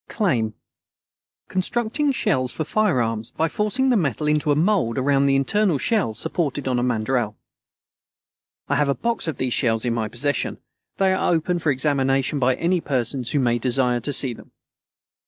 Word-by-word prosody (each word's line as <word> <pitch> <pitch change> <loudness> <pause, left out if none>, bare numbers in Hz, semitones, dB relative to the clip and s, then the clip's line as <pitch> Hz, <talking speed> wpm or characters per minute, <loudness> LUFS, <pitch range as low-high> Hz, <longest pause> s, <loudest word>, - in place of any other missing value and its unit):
Claim 120 - 0 0.9
Constructing 240 +9 -1
shells 150 - 0
for 155 - -3
firearms 120 - 0
by 160 - -1
forcing 215 +9 0
the - - +3
metal 150 - 0
into 150 0 +1
a - - +3
mould 165 - +1
around 135 +1 +2
an - - +3
internal 155 +6 +2
shell 195 - 0
supported 145 +2 -2
on 125 -1 +1
a - - 0
mandrel. 115 -2 0 1.3
I - - +1
have 150 -1 +2
a 140 - +1
box 230 -6 -2
of 160 - -3
these 130 -2 -1
shells 115 -1 0
in 120 - +1
my 115 -2 -1
possession. 130 +5 -2 0.4
They 190 -1 +3
are 190 - +1
open 175 +1 0
for 160 -3 +1
examination 135 0 +1
by 130 0 +2
any 175 +4 0
persons 125 -2 -2
who 145 - +1
may 120 -2 +1
desire 125 0 +1
to 130 +5 -3
see 135 -3 +2
them. - - -14
140 Hz, 175 wpm, -22 LUFS, 125-175 Hz, 1.3 s, the